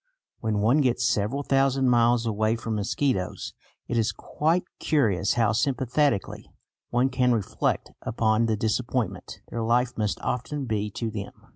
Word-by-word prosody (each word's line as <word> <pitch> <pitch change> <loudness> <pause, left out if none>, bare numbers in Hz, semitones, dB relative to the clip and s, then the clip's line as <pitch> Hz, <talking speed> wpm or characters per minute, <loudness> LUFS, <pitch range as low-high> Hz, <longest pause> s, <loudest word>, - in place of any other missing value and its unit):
When 110 -2 -1
one 120 +8 +4
gets 125 -3 +1
several 110 +8 0
thousand 135 -1 +2
miles 120 -1 +3
away 110 0 +1
from 115 -1 -4
mosquitoes, 105 -1 -1 0.3
it 120 - 0
is 110 - +1
quite 165 +4 0 0.2
curious 105 - +2
how 115 -4 +3
sympathetically 130 -1 0 0.4
one 125 +2 +2
can 125 -1 +2
reflect 105 -4 -1
upon 110 0 +1
the 110 -1 0
disappointment 115 +3 -2
their 115 - -3
life 120 +2 +1
must 105 -2 -1
often 135 +3 -3
be 105 -3 -1
to 110 +2 -4
them. 105 -2 -6
115 Hz, 145 wpm, -26 LUFS, 110-130 Hz, 0.4 s, one